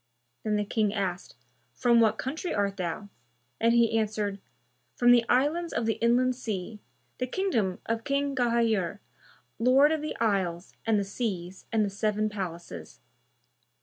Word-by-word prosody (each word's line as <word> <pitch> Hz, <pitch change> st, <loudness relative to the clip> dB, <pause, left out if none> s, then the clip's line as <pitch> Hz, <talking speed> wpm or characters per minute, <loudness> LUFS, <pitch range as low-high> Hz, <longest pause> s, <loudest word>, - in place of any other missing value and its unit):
Then 215 Hz, -1 st, 0 dB
the 210 Hz, 0 st, 0 dB
King 215 Hz, -1 st, 0 dB
asked, 190 Hz, -3 st, -3 dB, 0.4 s
"From 240 Hz, -1 st, +4 dB
what 220 Hz, -2 st, +3 dB
country 315 Hz, +7 st, -3 dB
art 200 Hz, -1 st, 0 dB
thou?"; 185 Hz, +3 st, -4 dB, 0.5 s
and 230 Hz, +1 st, +3 dB
he 230 Hz, -1 st, +4 dB
answered, 210 Hz, -2 st, -2 dB, 0.6 s
"From 245 Hz, 0 st, +5 dB
the 240 Hz, -1 st, +6 dB
Islands 305 Hz, +7 st, +1 dB
of 230 Hz, -, -1 dB
the 225 Hz, -, -1 dB
Inland 250 Hz, +2 st, +3 dB
Sea, 215 Hz, -4 st, -5 dB, 0.4 s
the 255 Hz, -, -1 dB
kingdom 235 Hz, -, 0 dB
of 230 Hz, 0 st, -2 dB
King 280 Hz, +1 st, 0 dB
Ghayur, 230 Hz, -7 st, +1 dB, 0.6 s
Lord 265 Hz, +5 st, +5 dB
of 315 Hz, -1 st, 0 dB
the 305 Hz, -, -4 dB
Isles 190 Hz, -5 st, -1 dB
and 220 Hz, -1 st, +3 dB
the 200 Hz, -, +1 dB
Seas 195 Hz, -4 st, -4 dB
and 220 Hz, -2 st, +2 dB
the -, -, -2 dB
Seven 215 Hz, +1 st, 0 dB
Palaces." 170 Hz, -, -7 dB
220 Hz, 150 wpm, -28 LUFS, 200-245 Hz, 0.6 s, the